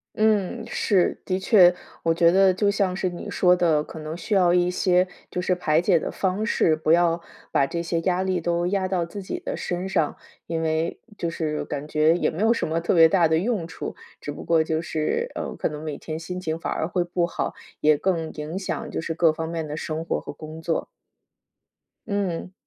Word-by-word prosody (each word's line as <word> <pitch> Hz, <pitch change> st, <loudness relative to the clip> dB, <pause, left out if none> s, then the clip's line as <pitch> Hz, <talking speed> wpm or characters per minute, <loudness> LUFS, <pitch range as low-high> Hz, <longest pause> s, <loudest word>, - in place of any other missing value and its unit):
嗯， 215 Hz, -3 st, +1 dB
是， 190 Hz, -4 st, +1 dB
的 185 Hz, 0 st, -1 dB
确。 185 Hz, -3 st, +6 dB, 0.3 s
我 165 Hz, -, +3 dB
觉 170 Hz, 0 st, +5 dB
得 190 Hz, +1 st, +5 dB
就 200 Hz, +2 st, +1 dB
像 200 Hz, -2 st, +1 dB
是 185 Hz, -1 st, -1 dB
你 175 Hz, -, -7 dB
说 180 Hz, -1 st, +4 dB
的， 165 Hz, -4 st, +2 dB
可 160 Hz, -, -11 dB
能 155 Hz, 0 st, -5 dB
需 190 Hz, +5 st, -2 dB
要 180 Hz, -3 st, +4 dB
一 180 Hz, 0 st, +3 dB
些 180 Hz, 0 st, +2 dB, 0.2 s
就 180 Hz, -, -2 dB
是 180 Hz, 0 st, +1 dB
排 160 Hz, -3 st, +2 dB
解 180 Hz, -1 st, +4 dB
的 -, -, -3 dB
方 195 Hz, +3 st, -1 dB
式， 165 Hz, -7 st, +3 dB
不 155 Hz, 0 st, 0 dB
要 170 Hz, 0 st, +4 dB, 0.3 s
把 140 Hz, -, +3 dB
这 170 Hz, +5 st, -3 dB
些 170 Hz, 0 st, -1 dB
压 180 Hz, +1 st, +1 dB
力 190 Hz, -1 st, 0 dB
都 170 Hz, +1 st, 0 dB
压 190 Hz, 0 st, 0 dB
到 185 Hz, -2 st, 0 dB
自 195 Hz, +4 st, -7 dB
己 -, -, -4 dB
的 -, -, -4 dB
身 180 Hz, +2 st, -3 dB
上。 160 Hz, -5 st, +1 dB, 0.3 s
因 165 Hz, -1 st, -2 dB
为 160 Hz, +1 st, -1 dB, 0.2 s
就 170 Hz, -, -2 dB
是 155 Hz, -2 st, -2 dB
感 145 Hz, +2 st, -5 dB
觉 155 Hz, +2 st, +3 dB
也 175 Hz, -, +1 dB
没 175 Hz, +7 st, -3 dB
有 225 Hz, +1 st, +5 dB
什 -, -, -2 dB
么 160 Hz, +1 st, 0 dB
特 170 Hz, -, 0 dB
别 165 Hz, -2 st, +8 dB
大 175 Hz, -1 st, +4 dB
的 160 Hz, 0 st, +2 dB
用 200 Hz, -3 st, -1 dB
处， -, -, -6 dB, 0.3 s
只 145 Hz, -, -5 dB
不 -, -, -8 dB
过 165 Hz, -1 st, +3 dB
就 160 Hz, 0 st, -1 dB
是， 170 Hz, -, -1 dB
呃， -, -, -4 dB
可 -, -, -1 dB
能 150 Hz, 0 st, -7 dB
每 155 Hz, -2 st, -4 dB
天 155 Hz, 0 st, -6 dB
心 180 Hz, +2 st, -5 dB
情 160 Hz, -2 st, -3 dB
反 -, -, -3 dB
而 160 Hz, -, -1 dB
会 180 Hz, 0 st, 0 dB
不 175 Hz, 0 st, 0 dB
好， 170 Hz, -, -3 dB, 0.2 s
也 150 Hz, 0 st, +4 dB
更 165 Hz, -2 st, -1 dB
影 155 Hz, +4 st, -5 dB
响 175 Hz, -6 st, -4 dB
就 -, -, -2 dB
是 165 Hz, 0 st, -3 dB
各 165 Hz, -1 st, +4 dB
方 160 Hz, +1 st, -4 dB
面 165 Hz, -2 st, -3 dB
的 150 Hz, -, -5 dB
生 160 Hz, +1 st, -4 dB
活 -, -, -1 dB
和 -, -, -7 dB
工 155 Hz, +2 st, -9 dB
作。 165 Hz, 0 st, -1 dB, 1.2 s
嗯。 190 Hz, -4 st, -2 dB
170 Hz, 240 characters per minute, -24 LUFS, 160-185 Hz, 1.2 s, 别